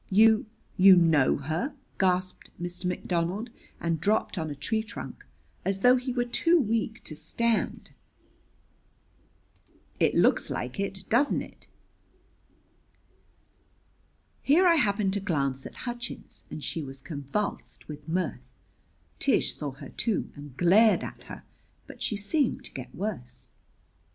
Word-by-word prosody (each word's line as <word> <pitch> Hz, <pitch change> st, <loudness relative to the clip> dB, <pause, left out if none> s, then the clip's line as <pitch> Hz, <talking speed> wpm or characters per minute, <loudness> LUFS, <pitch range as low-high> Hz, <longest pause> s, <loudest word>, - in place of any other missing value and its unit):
"You 220 Hz, +2 st, +5 dB, 0.3 s
you 190 Hz, 0 st, +9 dB
know 160 Hz, -6 st, +4 dB
her?" 160 Hz, -, -3 dB, 0.2 s
gasped 185 Hz, -1 st, 0 dB
Mr. 175 Hz, +1 st, -4 dB
McDonald, 180 Hz, +5 st, -2 dB, 0.3 s
and 165 Hz, -2 st, -1 dB
dropped 210 Hz, +4 st, +1 dB
on 160 Hz, -4 st, -3 dB
a 145 Hz, -, -5 dB
tree 220 Hz, +11 st, -1 dB
trunk, 220 Hz, +1 st, -8 dB, 0.4 s
as 195 Hz, 0 st, -1 dB
though 250 Hz, +3 st, +7 dB
he 255 Hz, +1 st, -2 dB
were 245 Hz, -1 st, 0 dB
too 335 Hz, +8 st, +4 dB
weak 225 Hz, -2 st, -1 dB
to 155 Hz, -, -7 dB
stand. 225 Hz, +9 st, -1 dB, 2.1 s
"It -, -, +3 dB
looks -, -, +3 dB
like -, -, -4 dB
it, 195 Hz, -1 st, -4 dB
doesn't 275 Hz, +6 st, +3 dB
it?" -, -, -15 dB, 2.7 s
Here 325 Hz, +7 st, +4 dB
I 340 Hz, -2 st, +6 dB
happened 200 Hz, -6 st, +1 dB
to 205 Hz, -, 0 dB
glance 140 Hz, -8 st, -1 dB
at -, -, -14 dB
Hutchins, 240 Hz, 0 st, -6 dB
and 150 Hz, -, -7 dB
she 165 Hz, -, -3 dB
was 135 Hz, -2 st, -8 dB
convulsed 145 Hz, +8 st, -4 dB
with 150 Hz, 0 st, -9 dB
mirth! 165 Hz, -7 st, -1 dB, 0.8 s
Tish -, -, +2 dB
saw 145 Hz, -, -3 dB
her, 140 Hz, 0 st, -10 dB
too, 225 Hz, -5 st, -1 dB
and 145 Hz, -3 st, -11 dB
glared 205 Hz, +6 st, +5 dB
at -, -, -8 dB
her; -, -, -9 dB, 0.4 s
but -, -, -13 dB
she 215 Hz, -, 0 dB
seemed 245 Hz, +7 st, 0 dB
to -, -, -8 dB
get 130 Hz, -1 st, -8 dB
worse. 125 Hz, -, -5 dB
190 Hz, 135 wpm, -28 LUFS, 155-225 Hz, 2.7 s, you